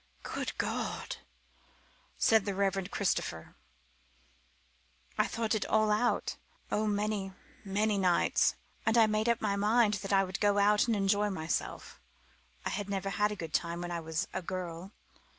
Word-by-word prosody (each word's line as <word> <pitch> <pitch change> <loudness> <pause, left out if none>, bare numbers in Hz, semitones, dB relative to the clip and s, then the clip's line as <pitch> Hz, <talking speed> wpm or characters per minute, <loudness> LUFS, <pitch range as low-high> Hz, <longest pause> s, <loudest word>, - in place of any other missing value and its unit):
"Good - - -4
God!" - - -3 1.0
said 220 -3 +4
the 200 -2 -2
Reverend 195 -1 0
Christopher. 85 - -2 1.6
"I - - +2
thought 225 -1 -1
it 220 - +1
all 215 -1 +3
out 225 +3 +1 0.3
oh, 215 +1 +1
many, 205 -2 -1 0.3
many 205 +1 +1
nights! 180 -2 +3 0.3
and 225 +1 +2
I 225 - +7
made 215 +1 +1
up 235 0 +2
my 205 -2 +1
mind 210 +2 +3
that 195 - -5
I 195 -1 +5
would 190 0 -4
go 205 -1 +3
out 210 +2 +4
and 230 - +2
enjoy 205 +1 +2
myself. 160 - -3 0.7
I 205 - -1
never 195 -1 -2
had 210 +2 +1
a - - -3
good 165 -5 -7
time 170 0 0
when 175 0 -4
I 170 - -2
was 160 0 -2
a 190 - -2
girl. 180 0 -5
200 Hz, 155 wpm, -31 LUFS, 185-215 Hz, 1.6 s, I